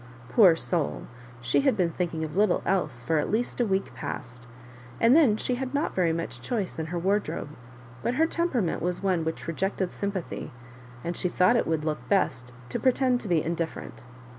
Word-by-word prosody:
Poor 185 - +7
soull 165 -2 -2 0.4
she 120 - +2
had 270 -5 +2
been 175 -3 +2
thinking 165 -2 -2
of 155 0 -5
little 205 -2 +3
else 175 -10 0
for 155 +5 +1
at - - -1
least 240 +3 -1
a 235 - +2
week 195 0 -1
past; 125 0 -7 0.5
atid 230 +2 +5
then 275 -9 +5
she 250 - -1
had 260 +2 -3
not 290 - 0
very 175 -3 +2
much 165 +1 -4
choice 210 -9 -2
in 160 - -3
ber 175 +2 -3
wardrobe; 195 -3 -1 0.5
but 240 - -1
her 320 +4 +4
temperament 305 - 0
was 180 +2 -2
one 185 -4 +1
which 160 0 -4
rejected 190 +2 -1
sympathy, 200 -6 -4 0.5
and 170 +1 -3
she 180 - -1
thought 185 +6 +4
it 235 - +1
would 160 -1 0
look 155 -1 -3
best 130 -11 +1 0.2
to 120 - -3
pretend 255 -1 +2
to - - -7
be 170 -4 +2
indifferent. 165 0 -4
185 Hz, 190 wpm, -27 LUFS, 160-230 Hz, 0.5 s, Poor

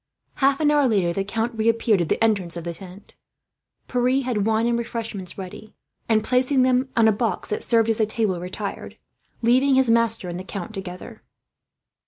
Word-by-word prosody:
Half 275 0 +2
an 295 -1 +3
hour 290 -2 +3
later, 190 -7 +1
the 195 - -1
count 225 +3 -2
reappeared 225 -2 +2
at 170 - -2
the - - +1
entrance 195 -6 0
of 170 - -6
the 170 0 -4
tent. 190 +3 -13 0.7
Pierre 255 +2 +1
had 225 -5 -1
wine 225 +1 +2
and 235 0 +1
refreshments 225 -5 -6
ready 195 +3 -9 0.3
and, 215 -1 +3
placing 255 +3 +2
them 255 +1 +2
on 225 -1 +5
a - - +5
box 210 -2 -2
that 210 - -2
served 230 -2 +3
as 225 - 0
a 220 - +2
table, 215 -5 -1
retired; 185 +3 -6 0.5
leaving 260 +4 +4
his 260 -3 +3
master 230 -4 +2
and 175 0 -5
the - - -6
count 195 +1 -7
together. 185 -3 -8
225 Hz, 190 wpm, -23 LUFS, 195-245 Hz, 0.7 s, on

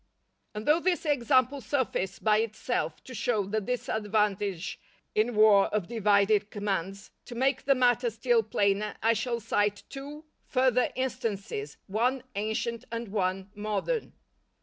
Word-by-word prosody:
_" - - -42 0.5
And 210 +1 -5
though 305 +3 +4
this 355 -1 0
example 270 -1 +2
suffice 220 -6 -1
by 215 -1 +3
itself 225 +2 -2
to 260 - -10
show 220 -3 0
the 215 +3 -1
disadvantage 210 -5 -1 0.3
in 225 +2 +1
war 210 -2 +6
of 205 -5 -2
divided 210 -2 +3
commands, 195 -2 -3
to 240 - -9
make 265 +3 +1
the 275 - +4
matter 245 -1 +3
still 230 +1 +2
plainer 205 -1 0
I 225 +1 +5
shall 235 +2 -2
cite 205 -2 0
two 290 +3 -8 0.2
further 255 -1 +2
instances, 220 - -3
one 245 +6 0
ancient 220 +2 -2
and 230 -2 -4
one 190 -1 -1
modern. 215 - -2
220 Hz, 140 wpm, -28 LUFS, 205-250 Hz, 0.5 s, war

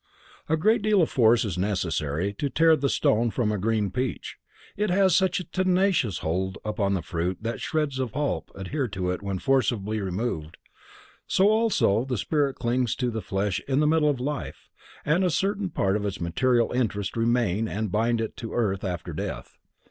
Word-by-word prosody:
A 160 - +2
great 215 +7 +3
deal 210 -3 +3
of - - -1
force 120 -1 +4
is 90 -4 -3
necessary 90 -2 -1
to 145 - 0
tear 160 +3 +4
the 140 -2 0
stone 115 0 +2
from 110 -1 0
a 105 - -2
green 105 -1 0
peach; 125 +2 -3 0.4
it 210 0 0
has 190 -1 +4
such 190 -1 +2
a - - -4
tenacious 185 - +1
hold 95 +4 -1
upon 100 -2 0
the 90 - -3
fruit 85 +2 -2
that 115 +1 -4
shreds 150 -5 -1
of 125 -5 -2
pulp 145 +1 -2
adhere 130 +8 -3
to 95 -3 -2
it 90 - -4
when 100 -1 -3
forcibly 110 -3 0
removed, 90 -5 -3 0.7
so 195 +2 +4
also 215 - +2
the 130 -2 -3
spirit 140 +5 0
clings 120 -1 0
to 125 -2 -1
the 110 -1 -3
flesh 95 -1 -1
in 140 +3 +2
middle 155 -1 +3
life 135 +3 -5 0.3
and 165 +6 +2
a 180 - +3
certain 195 +3 0
part 100 - 0
of 105 - -1
its 100 -2 -3
material 120 +8 +1
interest 105 -6 -1
remain 115 -3 +1
and 110 -2 -3
bind 115 +3 +1
it 110 - -4
to 115 - -6
earth 100 -5 0
after 90 -4 -4
death. - - -6
115 Hz, 185 wpm, -26 LUFS, 100-150 Hz, 0.7 s, force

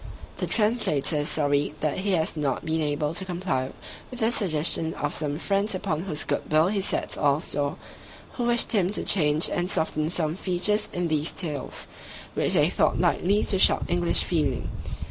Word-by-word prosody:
The - - -3
Translator 210 - +1
is 145 0 -1
sorry 145 -1 0
that 155 +3 -1
he 195 +1 0
has 160 -2 0
not 145 -4 -2
been 160 0 -1
able 150 0 -1
to 180 - +1
comply 175 -8 -2 0.4
with 250 - -9
the 225 +1 +2
suggestion 165 -5 +2
of - - -3
some 145 -1 -2
friends 200 +3 0
upon 170 -4 -2
whose 155 -6 0
good - - -3
will 155 +3 +4
he 200 -1 -1
sets - - -1
all 145 -1 +2
store, 145 -2 -2 0.6
who 240 - -3
wished 240 0 +3
him 195 -6 +2
to - - 0
change 150 -3 +3
and 175 +1 -2
soften 155 -3 -1
some 165 -2 +1
features 195 +3 0
in 175 -1 -2
these 155 0 0
tales, 150 -7 -4 0.5
which - - +1
they - - +3
thought - - +1
likely 200 +4 +2
to 190 - +1
shock - - +5
English 175 0 +1
feeling. 150 -7 -1
165 Hz, 185 wpm, -25 LUFS, 150-195 Hz, 0.6 s, shock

